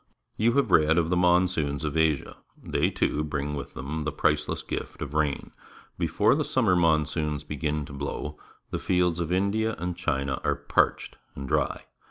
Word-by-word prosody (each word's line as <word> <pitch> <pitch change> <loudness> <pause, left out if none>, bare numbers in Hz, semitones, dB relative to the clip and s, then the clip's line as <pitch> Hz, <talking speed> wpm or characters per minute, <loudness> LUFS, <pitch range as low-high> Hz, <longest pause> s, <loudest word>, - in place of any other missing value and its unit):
You 115 +2 +2
have 135 -7 +2
read 80 -1 +5
of 85 0 +1
the - - +3
monsoons 90 -5 +2
of 75 0 -3
Asia. 80 -3 +1 0.2
They, - - 0
too, 75 - 0
bring 75 -1 -3
with 70 -2 -6
them 75 +4 -4
the 75 - -1
priceless 75 0 0
gift - - -5
of 70 - -5
rain. 75 -2 -1 0.5
Before 90 +6 +3
the 150 +2 +1
summer 115 -10 +2
monsoons 75 -3 +1
begin 75 0 -2
to 70 - -11
blow, 75 +1 -5 0.3
the - - -2
fields 90 -2 +1
of 85 -1 -2
India 105 +4 +1
and 90 0 -3
China 70 -6 -1
are - - +1
parched - - 0 0.2
and 70 0 -6
dry. - - 0
80 Hz, 175 wpm, -27 LUFS, 75-90 Hz, 0.5 s, read